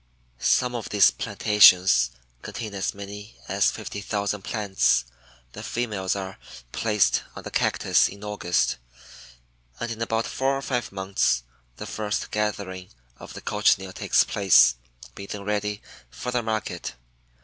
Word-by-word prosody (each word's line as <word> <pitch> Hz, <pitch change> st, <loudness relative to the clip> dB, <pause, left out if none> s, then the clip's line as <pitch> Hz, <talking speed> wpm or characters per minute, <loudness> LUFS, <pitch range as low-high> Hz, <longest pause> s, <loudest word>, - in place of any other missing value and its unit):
Some 125 Hz, -, +2 dB
of 120 Hz, -3 st, -5 dB
these 105 Hz, -2 st, +5 dB
plantations 95 Hz, -, +5 dB, 0.3 s
contain 110 Hz, -3 st, -6 dB
as 95 Hz, 0 st, -2 dB
many 100 Hz, +2 st, -9 dB
as -, -, +2 dB
50,000 100 Hz, 0 st, -3 dB
plants. 95 Hz, -, +1 dB, 0.5 s
The -, -, -9 dB
females 105 Hz, -6 st, -2 dB
are 95 Hz, -1 st, -6 dB, 0.3 s
placed 105 Hz, -, +2 dB
on -, -, -8 dB
the -, -, -7 dB
Cactus -, -, +2 dB
in 100 Hz, +1 st, -11 dB
August 90 Hz, -10 st, 0 dB, 1.0 s
and 120 Hz, -, -3 dB
in 115 Hz, 0 st, -6 dB
about 115 Hz, 0 st, 0 dB
four 135 Hz, +1 st, 0 dB
or 135 Hz, -, -6 dB
five 125 Hz, -3 st, -2 dB
months 95 Hz, -11 st, 0 dB, 0.3 s
the -, -, -7 dB
first 105 Hz, -1 st, -3 dB
gathering 100 Hz, -3 st, -3 dB, 0.3 s
of -, -, -11 dB
the -, -, -8 dB
Cochineal 95 Hz, -2 st, +1 dB
takes -, -, +3 dB
place, 65 Hz, -12 st, +5 dB, 0.4 s
being 100 Hz, -, -9 dB
then 100 Hz, -1 st, -5 dB
ready 105 Hz, 0 st, -2 dB, 0.3 s
for 125 Hz, -, -5 dB
the 125 Hz, -1 st, 0 dB
market. 110 Hz, -1 st, -4 dB
105 Hz, 140 wpm, -25 LUFS, 95-110 Hz, 1.0 s, these